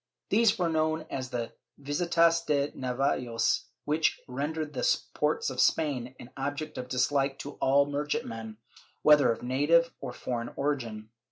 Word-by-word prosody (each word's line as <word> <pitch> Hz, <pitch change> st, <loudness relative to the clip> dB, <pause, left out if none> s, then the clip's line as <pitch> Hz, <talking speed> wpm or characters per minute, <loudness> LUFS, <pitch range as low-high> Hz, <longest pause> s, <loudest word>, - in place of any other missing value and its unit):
These 225 Hz, -1 st, +4 dB
were 180 Hz, -, +1 dB
known 160 Hz, -1 st, 0 dB
as 130 Hz, -1 st, -4 dB
the 120 Hz, -2 st, -3 dB, 0.3 s
Visitas 165 Hz, +3 st, +2 dB
de 145 Hz, -1 st, +1 dB
Navios, 125 Hz, -2 st, 0 dB, 0.2 s
which 150 Hz, +2 st, +1 dB
rendered 150 Hz, +4 st, -3 dB
the -, -, +2 dB
ports 455 Hz, +1 st, 0 dB
of -, -, 0 dB
Spain 130 Hz, -5 st, +1 dB
an 120 Hz, -, -11 dB
object 145 Hz, +3 st, -4 dB
of 125 Hz, 0 st, -6 dB
dislike 135 Hz, +1 st, +1 dB
to 145 Hz, -, -6 dB
all 140 Hz, +1 st, +4 dB
merchant 145 Hz, +1 st, -2 dB
men, 110 Hz, -1 st, -7 dB, 0.5 s
whether 150 Hz, -4 st, +6 dB
of 115 Hz, -, -4 dB
native 150 Hz, +7 st, +3 dB
or -, -, -4 dB
foreign 120 Hz, -1 st, -4 dB
origin. 115 Hz, -7 st, -3 dB
140 Hz, 150 wpm, -29 LUFS, 125-155 Hz, 0.5 s, whether